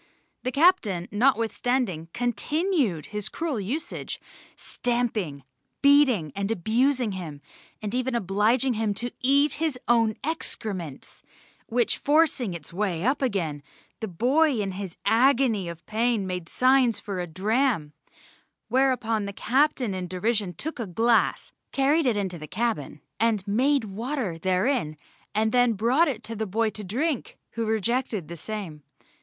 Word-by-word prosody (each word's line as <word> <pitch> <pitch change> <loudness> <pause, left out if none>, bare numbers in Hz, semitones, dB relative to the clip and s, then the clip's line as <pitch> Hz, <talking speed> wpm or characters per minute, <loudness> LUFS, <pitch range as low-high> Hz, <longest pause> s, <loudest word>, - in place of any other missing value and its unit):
The 255 - -2
Captain, 250 - +3
notwithstanding, 230 -5 +1
continued 245 - 0
his 210 -1 -2
cruel 320 -8 -2
usage, 245 +12 -4 0.4
stamping, 220 - -2 0.4
beating 270 - +5
and 200 0 -2
abusing 230 +4 +1
him, 170 -6 -6 0.4
and 210 0 -3
even 255 0 0
obliging 225 +5 +2
him 215 -2 -1
to 240 +4 -2
eat 280 +3 +3
his 315 -5 0
own 230 -2 +3
excrements, 200 - -4 0.5
which 240 0 0
forcing 285 - +2
its 165 -1 -8
way 185 -2 -1
upwards 270 +1 +2
again, 165 - -3 0.4
the 220 - -3
boy 255 - +2
in 200 -2 -1
his 190 -2 -6
agony 235 -6 +3
of 170 -1 -9
pain 225 -1 0
made 180 -2 -4
signs 255 -2 +3
for 200 -3 -5
a 175 - -3
dram, 205 - 0 0.8
whereupon 245 -5 +1
the 200 - -5
captain 260 -2 +1
in 185 -1 -4
derision 195 0 -1
took 315 - -3
a 230 - -3
glass, 225 +6 +2 0.2
carried 280 +2 +2
it 230 -4 +2
into 185 -4 -2
the 155 - -8
cabin, 210 - -2 0.2
and 220 -4 +1
made 260 +6 +2
water 215 - -3
therein, 185 - 0 0.4
and 220 +1 +2
then 245 -1 +4
brought 245 - +3
it 240 -6 -3
to 225 +1 -6
the 220 0 -3
boy 220 +3 0
to 210 - -6
drink, 260 - -2
who 230 -1 -2
rejected 220 - -1
the 170 - -6
same. 175 -4 -6
225 Hz, 140 wpm, -26 LUFS, 190-255 Hz, 0.8 s, beating